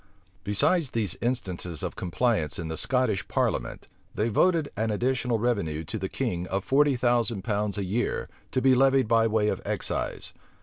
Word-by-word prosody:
Besides 145 - +2
these 110 -8 -1
instances 90 - -3
of - - -3
compliance 90 -2 0
in 80 -2 -4
the 80 - -3
Scottish 125 -1 +1
parliament, - - -1 0.3
they 110 +2 0
voted 165 - +2
an 110 +2 -1
additional 120 +2 0
revenue 100 -10 -1
to 110 +5 -4
the 95 -1 -3
king 90 -9 -2
of 95 0 -2
forty 145 0 +3
thousand 120 -5 +1
pounds 105 -2 -1
a 100 - -1
year, 105 +6 -1 0.2
to 130 - 0
be 135 -1 +6
levied 135 -1 +4
by 115 0 +4
way 110 -1 +1
of - - -1
excise. - - -3
115 Hz, 170 wpm, -27 LUFS, 100-125 Hz, 0.3 s, be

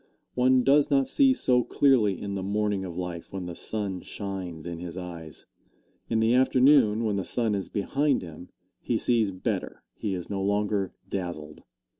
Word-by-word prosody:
One 130 0 +3
does 140 +2 +4
not 135 -2 +3
see 275 -2 +4
so 125 - +2
clearly 115 -10 +3
in 100 -1 -5
the 100 - -3
morning 100 0 -1
of 85 -2 -7
life 90 -2 -5
when 95 -2 -5
the 85 -1 -6
sun 100 -3 -4
shines 95 -5 -6
in 85 -1 -5
his 90 0 -7
eyes. 85 -5 -8 0.6
In 115 - +1
the 110 +1 +3
afternoon, 130 -3 +4
when 105 -3 0
the 95 - -1
sun 115 0 0
is 100 -2 -3
behind 140 +7 0
him, 85 +1 -10 0.3
he - - -1
sees 115 -4 +2
better 95 -1 -4
he 100 -3 -3
is 90 -2 -5
no 100 -1 -3
longer 100 -1 0
dazzled. 85 -6 -5
100 Hz, 175 wpm, -27 LUFS, 90-120 Hz, 0.6 s, does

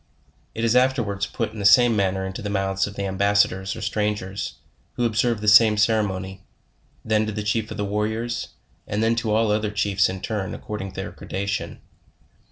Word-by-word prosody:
It 115 - -3
is 115 +1 +2
afterwards 115 -6 +1
put 115 - -3
in 110 - -8
the - - -3
same 115 +4 +6
manner 95 -1 0
into 95 0 -6
the 105 - -4
mouths 95 -1 0
of 100 - -9
the 100 - -3
ambassadors 100 0 +1
or 110 - -7
strangers, 105 - -2 0.4
who 120 - -1
observe 115 0 +1
the 105 - -4
same 110 0 +7
cer 110 +1 +3
emony, 95 -1 -4 0.7
then 110 -1 +1
to - - -2
the 105 0 -4
chief 105 +1 -1
of - - -7
the 105 - -1
warriors, 110 +4 -2 0.4
and 110 +2 +1
to 115 -1 -2
all 110 +1 +2
the 105 +1 +2
oth 110 - -4
er - - -1
chiefs 100 -2 +1
in 95 0 -5
turn, 100 -2 -3
according 95 -3 -6
to - - -18
their - - -5
gradation. 100 +1 -4
105 Hz, 200 wpm, -23 LUFS, 100-110 Hz, 0.7 s, same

